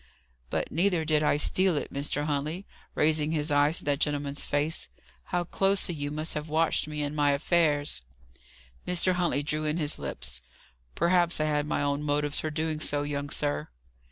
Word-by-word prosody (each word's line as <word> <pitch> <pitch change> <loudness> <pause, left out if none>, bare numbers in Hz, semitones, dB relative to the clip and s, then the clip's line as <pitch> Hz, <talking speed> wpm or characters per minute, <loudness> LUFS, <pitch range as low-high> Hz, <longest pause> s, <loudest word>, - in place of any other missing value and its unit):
"But - - -2
neither 175 0 +1
did 155 -1 +3
I 150 -1 +3
steal 185 +3 +3
it. - - -4
Mr. 145 +1 -1
Huntley" 155 +6 -2 0.3
raising 155 0 +2
his 150 -1 0
eyes 145 +2 +3
to - - -5
that 145 -1 +1
gentleman's 145 -2 -1
face 145 +3 -1 0.4
"how 175 0 -1
closely 195 +1 +1
you 145 -2 -3
must 155 +2 -1
have 150 +1 -4
watched 160 0 +1
me 150 -1 -3
and 145 +1 -3
my 145 -1 +3
affairs!" 145 - +1 0.9
Mr. 180 +1 +2
Huntley 175 -6 +1
drew 155 +1 -1
in 150 +2 0
his 150 -3 -2
lips. 65 -2 -5 0.5
"Perhaps 175 0 +3
I 155 - +2
had 150 -1 0
my 145 - 0
own 145 0 0
motives 145 0 +1
for 155 - -2
doing 155 0 -2
so, 145 -1 0
young 145 0 -3
sir." 75 - -1
150 Hz, 180 wpm, -28 LUFS, 145-160 Hz, 0.9 s, did